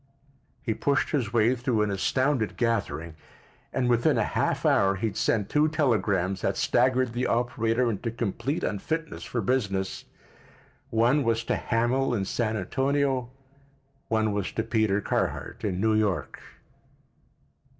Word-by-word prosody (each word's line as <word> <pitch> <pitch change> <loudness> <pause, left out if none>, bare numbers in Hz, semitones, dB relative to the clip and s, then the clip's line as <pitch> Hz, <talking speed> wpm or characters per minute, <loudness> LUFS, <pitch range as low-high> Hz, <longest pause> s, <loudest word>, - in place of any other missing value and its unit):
He 115 - 0
pushed 140 +5 0
his 125 -8 0
way 115 +1 +3
through 120 -3 0
an 105 - -1
astounded 130 +4 0
gathering, 90 -9 -1 0.6
and 130 -2 0
within 120 -1 +3
a - - +3
half - - -1
hour 95 0 +4
he 100 +4 -3
had 105 -4 -2
sent 105 -2 +1
two 150 +5 +3
telegrams 105 - +1
that - - -1
staggered 125 0 +2
the 125 +1 -1
operator 120 0 +1
into 115 +1 -2
complete 120 - -2
unfitness 160 +10 -3
for 120 - -3
business; 95 -5 -1 0.8
one 120 +6 +3
was 115 -1 +1
to - - 0
Hamil 120 +2 0
in 100 -3 -1
San 110 +2 -1
Antonio; 135 +4 0 0.8
one 110 -1 +1
was 100 -2 -2
to 110 - -1
Peter 110 -3 +1
Carhart - - -2
in 95 -3 -1
New 110 +2 +2
York. 105 -4 -1
115 Hz, 140 wpm, -27 LUFS, 105-130 Hz, 0.8 s, hour